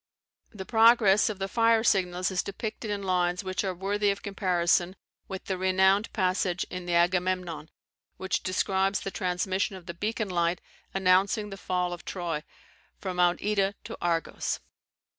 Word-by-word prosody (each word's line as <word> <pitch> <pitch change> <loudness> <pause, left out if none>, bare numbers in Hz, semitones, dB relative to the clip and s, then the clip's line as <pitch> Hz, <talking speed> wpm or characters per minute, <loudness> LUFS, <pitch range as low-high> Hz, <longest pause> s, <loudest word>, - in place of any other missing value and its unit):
The 195 -4 -8
progress 225 -3 +5
of 210 - -4
the 195 0 -3
fire 230 +2 +3
signals 185 -3 +1
is 185 - +1
depicted 215 +2 -5
in 205 -1 -2
lines 180 -1 0
which 185 +1 -2
are 190 -2 -2
worthy 200 +3 0
of 200 0 -2
comparison 180 -2 +1 0.3
with 190 -1 -7
the 190 -2 -3
renowned 190 +3 +3
passage 185 -2 0
in 180 -1 -6
the 175 - +1
Agamemnon, 175 -2 0 0.5
which 190 - -1
describes 190 +1 0
the 195 - -4
transmission 190 +3 -1
of 185 -2 -11
the 170 - -6
beacon 215 +3 -2
light 170 -1 0 0.3
announcing 195 +2 +2
the - - -5
fall 180 -2 -2
of 175 - -8
Troy, 170 -5 -4 0.5
from 185 -2 -5
Mount 175 -1 +2
Ida 200 -1 +1
to - - -7
Argos. 170 -1 -1
190 Hz, 160 wpm, -28 LUFS, 180-200 Hz, 0.5 s, progress